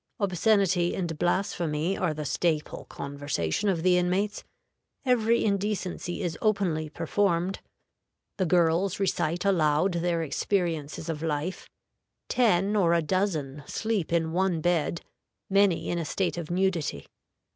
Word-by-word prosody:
Obscenity 195 -2 +2
and 170 -4 -2
blasphemy 175 -2 0
are 180 - 0
the 155 0 -5
staple 150 +1 -1
conversation 140 - -2
of 170 -4 0
the 180 -1 +4
inmates; 190 +4 0 0.6
every 235 -2 +3
indecency 200 -3 -2
is 170 -2 -3
openly 180 -8 +1
performed; 175 +3 0 0.8
the 185 - +1
girls 175 +3 +2
recite 175 -2 0
aloud 165 -1 +3
their 170 -1 0
experiences 160 -1 -2
of 160 -2 -3
life; 160 +3 -3 0.6
ten 210 -4 +2
or 170 -5 +3
a 170 - +2
dozen 155 -6 -1
sleep 220 -7 -2
in 165 -1 +1
one 180 -1 +1
bed, 170 0 0 0.5
many 195 -3 +3
in 175 - -1
a 165 - -3
state 185 +4 -1
of 170 -3 -5
nudity. 175 - -1
175 Hz, 125 wpm, -27 LUFS, 160-195 Hz, 0.8 s, the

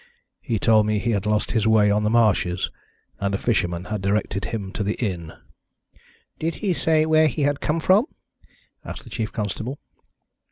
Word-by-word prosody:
He 115 -5 -2
told 110 0 +4
me 105 0 +1
he 115 +3 0
had 100 -1 -1
lost 105 0 0
his 110 -2 +1
way 105 -2 +4
on 105 +1 +2
the 105 - +2
marshes, 105 -6 +2 0.5
and 100 0 -1
a - - 0
fisherman 90 -7 0
had 105 - -2
directed 100 0 -1
him 100 -4 -4
to - - -4
the 105 +1 -1
inn." 90 -8 -3 1.1
"Did 165 +1 -2
he 200 -4 -1
say 160 -1 +2
where 155 0 +4
he 145 +1 -1
had 145 0 0
come 155 +2 0
from?" 195 - +4 0.8
asked - - -8
the - - -14
chief 110 -2 -3
constable. 110 +5 -4
110 Hz, 185 wpm, -23 LUFS, 100-140 Hz, 1.1 s, told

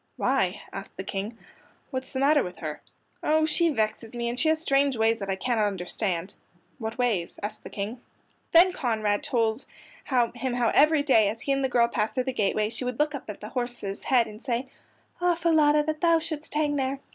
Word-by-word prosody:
"Why?" 210 -8 0
asked 195 0 -8
the 190 - -4
King. 200 +4 -4 0.5
"What 260 -2 -1
is 260 - -14
the - - -3
matter 290 +2 +4
with 180 - -5
her?" 155 -2 -6 0.4
"Oh, 315 +1 +3
she 335 +2 +2
vexes 225 -2 -2
me, 235 0 -1
and 245 +1 -2
she 315 - +3
has 315 0 +2
strange 275 -4 +2
ways 225 +1 +2
that 195 -1 -5
I 195 - +1
cannot 220 +1 +1
understand." 185 -1 -3 0.5
"What 225 +2 -4
ways?" 225 -9 0
asked 215 +1 -4
the - - -8
King. 215 +5 -5 0.5
Then 360 +2 +7
Conrad 215 - 0
told 230 0 0 0.4
him 245 0 0
how 240 -2 +2
every 305 0 +5
day 225 -8 +4
as 225 +2 -5
he 280 - -1
and 275 0 +1
the 265 - +1
girl 240 -1 +4
passed 220 -2 -1
through 255 - +1
the 260 0 -3
gateway 210 -1 +1
she 235 - -6
would 250 -1 -3
look 300 +1 +1
up 275 -6 -7
at 210 - -7
the 210 - -7
horse's 240 -6 -4
head 245 -3 +4
and 215 0 -11
say: 255 0 -2 0.5
"Ah, 355 -1 +3
Falada, 310 -3 +4
that 310 0 -3
thou 335 -1 +5
shouldst 315 -2 -5
hang 295 -1 +1
there!" 270 0 -1
245 Hz, 215 wpm, -26 LUFS, 215-290 Hz, 0.5 s, Then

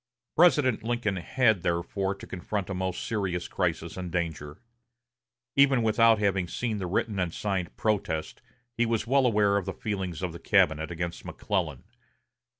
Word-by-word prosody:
President 150 -9 +4
Lincoln 115 -4 -1
had, 110 +1 +2
therefore, 90 +3 -1
to - - -11
confront 95 +1 -4
a - - -1
most 95 -1 -3
serious 95 -6 -2
crisis 85 -2 -2
and 90 -2 -5
danger. 80 -4 -3 1.0
Even 140 -3 +5
without 115 0 +5
having 100 -3 +1
seen 110 +3 -2
the 95 - -3
written 100 +3 -1
and 90 -2 0
signed 95 -1 -3
protest, 100 -7 -1 0.3
he 120 0 +1
was 115 -2 0
well 135 +1 +3
aware 105 -3 +3
of 100 - -3
the - - -2
feelings 95 -5 -4
of 90 -3 -2
the 85 - -8
cabinet 80 +1 +2
against 85 0 -4
McClellan. - - -3
95 Hz, 155 wpm, -28 LUFS, 85-115 Hz, 1.0 s, Even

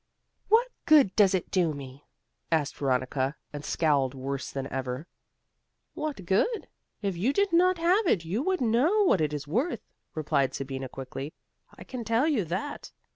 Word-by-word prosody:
"What 450 +3 +5 0.2
good 290 - +6
does 195 -3 +5
it 185 - -3
do 170 -5 +2
me?" 135 0 -10 0.4
asked 155 -4 +1
Veronica, 130 +1 0 0.2
and 145 0 -6
scowled 140 -5 +1
worse 135 0 -4
than 135 -1 -4
ever. 130 +2 -3 0.9
"What 295 -11 -4
good? 315 - +1 0.4
if 195 -2 -1
you 205 +10 +1
did 400 +4 +1
not 365 +2 +4
have 360 +5 +3
it 170 - +2
you 195 +9 -1
would 370 +2 0
know 265 - +3
what 200 - +3
it 150 -1 +1
is 145 -1 -5
worth," 245 - -1 0.3
replied 140 -4 0
Sabina, 135 -1 -5
quickly. 135 +3 -7 0.4
"I - - -9
can 250 -2 -6
tell 230 +6 +2
you 275 -10 +2
that. 190 - -4
175 Hz, 165 wpm, -28 LUFS, -, 0.9 s, good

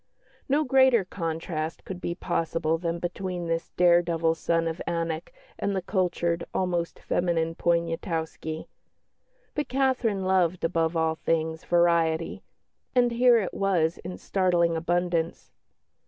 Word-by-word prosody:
No 290 +3 +3
greater 260 -6 +4
contrast 165 -2 -4
could 185 -1 -7
be 170 - -2
possible 165 -2 -1
than 170 0 -2
between 175 +1 -4
this 165 0 -2
dare 175 -1 +6
devil 165 -1 +1
son 165 0 0
of 165 +1 -4
Anak 165 -1 -2 0.3
and 200 - -1
the 190 - 0
cultured, 175 -3 0
almost 175 -2 -1
feminine 165 -2 0
Poniatowski; 165 -1 -2 0.9
but 295 -1 -2
Catherine 255 -7 +1
loved, 185 -2 +2
above 165 0 +1
all 160 0 +2
things, 160 0 -1
variety, 170 -2 +2 0.5
and 245 -1 +4
here 240 0 +5
it 200 -5 -1
was 175 -5 +1
in 180 +1 -7
startling 175 -3 +1
abundance. 170 0 -1
170 Hz, 125 wpm, -27 LUFS, 165-185 Hz, 0.9 s, dare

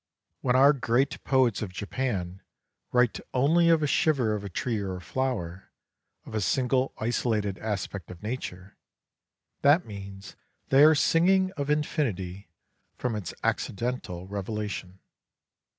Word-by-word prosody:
When 125 -1 +1
our 140 +3 +7
great 130 +2 0
poets 130 -5 +2
of 100 -4 -4
Japan 95 -3 -3 0.5
write 125 -2 +2 0.2
only 165 +6 +4
of 165 -2 +4
a - - +3
shiver 135 -6 +2
of 105 -1 -3
a 100 - -5
tree 110 +5 -2
or 95 -2 -3
a - - -6
flower, 95 -3 -3 0.6
of - - -10
a 110 - 0
single 130 +3 +1
isolated 110 -3 -1
aspect 100 -4 -4
of 90 0 -11
nature, 100 -5 -6 0.8
that 145 +5 +5
means 100 -1 -9 0.4
that - - +1
they 140 - +9
are 155 0 +7
singing 185 +5 +3
of 145 -6 -4
infinity 105 - -1 0.5
from 125 -3 -2
its 105 -5 -4
accidental 100 -6 -2
revelation. 100 -2 -5
115 Hz, 135 wpm, -27 LUFS, 100-135 Hz, 0.8 s, they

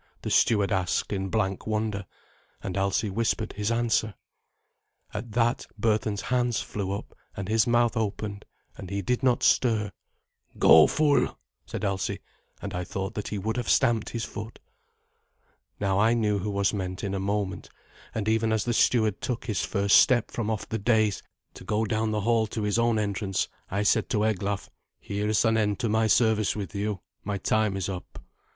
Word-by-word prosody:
the - - -3
steward 105 -3 +3
asked 95 +1 0
in 95 -1 -2
blank 95 -2 -1
wonder, 105 -2 -2 0.6
and 95 -2 -4
Alsi 100 +2 0
whispered 110 +1 -1
his 105 +1 -2
answer. 115 -3 +1 1.0
At 115 -3 -6
that 120 +1 +1
Berthun's 105 -2 +1
hands 125 -3 0
flew 100 -2 -4
up, 100 - -6 0.2
and 100 - -4
his 110 +2 +2
mouth 120 0 +3
opened, 105 -2 -3 0.3
and 95 - -9
he 100 0 -3
did 125 +6 0
not 125 -2 +2
stir. 110 -5 +3 0.7
"Go, - - +8
fool," 150 -2 +2 0.3
said - - -4
Alsi, 95 -1 -1 0.5
and - - -5
I 90 - -2
thought 95 +2 -4
that 105 - -4
he 105 - -3
would 110 +4 -2
have 120 - -2
stamped 120 -5 +3
his 115 -1 -4
foot. 110 +2 -8 1.2
Now 95 -1 +1
I 115 +3 +4
knew 105 -3 +1
who 100 +3 -3
was 100 0 +1
meant 95 -2 -4
in 100 -1 -2
a 100 - -1
moment, 100 -1 -2 0.5
and 110 -2 -2
even 110 0 +2
as 110 -1 +1
the 120 - 0
steward 110 -3 +2
took 120 -4 -3
his 105 -4 -1
first 100 -1 +4
step 120 -4 +4
from 115 -2 -2
off 110 -2 -2
the 110 - -3
dais 110 -1 +2 0.3
to - - -11
go 110 +1 0
down 110 +1 0
the 105 -1 -1
hail 115 +1 +2
to 110 0 -4
his 105 +2 +1
own 115 -1 +2
entrance, 100 -2 -1 0.2
I 100 +2 -1
said 105 - +2
to 105 - +1
Eglaf, 100 -1 -1 0.3
"Here 100 +1 -3
is 110 +2 +2
an 110 0 +3
end 105 -2 +1
to 115 - 0
my 110 +1 +2
service 110 -1 +3
with 100 -2 -5
you. 100 -2 -2 0.2
My 100 0 -2
time 105 +1 +1
is 95 - -2
up." 95 -2 -7
105 Hz, 185 wpm, -27 LUFS, 100-110 Hz, 1.2 s, Go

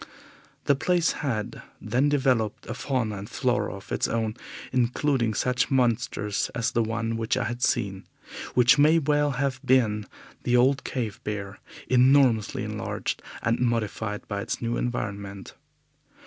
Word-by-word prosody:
This 140 - +3
place 175 0 +2
had 115 -8 -3 0.2
then 125 +7 +1
developed 130 -7 +1
a 115 - -4
fauna 125 -5 -2
and 100 +3 -8
flora 120 -6 0
of 100 - -12
its - - +1
own, 115 -1 -1 0.4
including 125 -2 +1
such 125 +3 +1
monsters 120 -5 0
as 115 0 0
the 115 - +1
one 115 0 -2
which 115 0 0
I - - 0
had 120 +3 -4
seen, 95 -5 0 0.5
which 125 +4 +5
may 155 +3 +6
well 145 -2 +2
have 135 0 -1
been 110 -6 +2 0.3
the 125 0 +2
old 135 +3 +3
cave 115 -6 -4
bear, 100 -1 -5 0.3
enormously 125 -4 +4
enlarged - - -3 0.2
and 115 0 +1
modified 110 -3 -1
by 100 -1 -3
its - - -3
new 120 0 -2
environment. 100 -5 -4
120 Hz, 145 wpm, -26 LUFS, 105-130 Hz, 0.5 s, may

